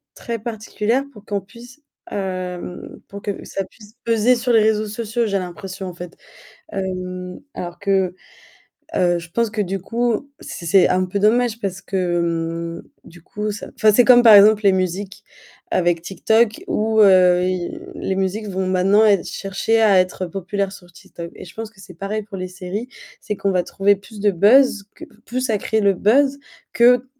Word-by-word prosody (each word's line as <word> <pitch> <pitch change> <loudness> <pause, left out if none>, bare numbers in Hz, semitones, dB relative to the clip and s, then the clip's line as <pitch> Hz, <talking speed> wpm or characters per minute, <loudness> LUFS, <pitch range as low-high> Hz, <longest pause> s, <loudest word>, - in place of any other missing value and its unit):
très 230 -1 -5
particulière 225 +2 -2
pour 210 -5 -16
qu'on 200 -1 -2
puisse, 235 +8 -15 0.3
hem, 185 -2 -5
pour 200 0 -9
que 200 -1 -5
ça 195 - -4
puisse 210 -1 -18
peser 230 +2 +3
sur 245 +1 -1
les 225 - +6
réseaux 215 0 +1
sociaux 230 +2 -2
j'ai 200 -2 0
l'impression, 185 +1 -7
en 180 - -7
fait. 175 0 -9 0.6
Hem, 185 -1 -5
alors 175 -1 -6
que 195 -2 +1 0.8
heu, 175 -1 +2
je 170 0 -10
pense 230 +4 0
que 215 0 -3
du 195 +1 -3
coup, 235 +6 -2
c'est 170 - -8
c'est 185 +3 +5
un 185 0 +1
peu 195 +3 -3
dommage 230 +2 +2
parce 195 -2 -4
que, 170 -3 -2
mmh, - - -18 0.2
du 170 0 -16
coup 210 +4 -4
ça 205 - -8
enfin, 215 -1 +4
c'est 245 +4 +5
comme, 245 -1 +7
par 225 -3 +9
exemple, 210 +1 +7
les 195 - +6
musiques. 190 +1 -3 0.5
Avec 175 -2 +1
TikTok 220 +5 +1
où, 220 +1 +1
heu, 180 -2 +5
i 185 - -3 0.2
les 190 - -3
musiques 195 +3 -2
vont 190 0 -2
maintenant 190 +3 +3
ê 200 -4 +4
chercher 205 +3 -1
à 200 -4 +5
être 185 0 -2
populaires 195 +2 -3
sur 180 -3 -14
TikTok. 170 0 -10
Et - - -10
je 175 - -14
pense 225 -1 -6
que 225 - -28
c'est 190 - -12
pareil 200 +5 -4
pour 200 -2 -9
les 185 0 -4
séries. 190 +6 -6 0.3
C'est 210 - -4
qu'on 195 - -1
va 180 -2 +1
trouver 200 +3 +2
plus 205 +2 -13
de 205 - +3
buzz, 210 +3 +4
qu - - -10
p - - -24
plus 255 +1 -2
à 215 - +1
créer 220 +2 0
le 200 -1 +4
buzz, 270 +9 +2 0.3
que 245 +1 +4
200 Hz, 190 wpm, -20 LUFS, 185-220 Hz, 0.8 s, par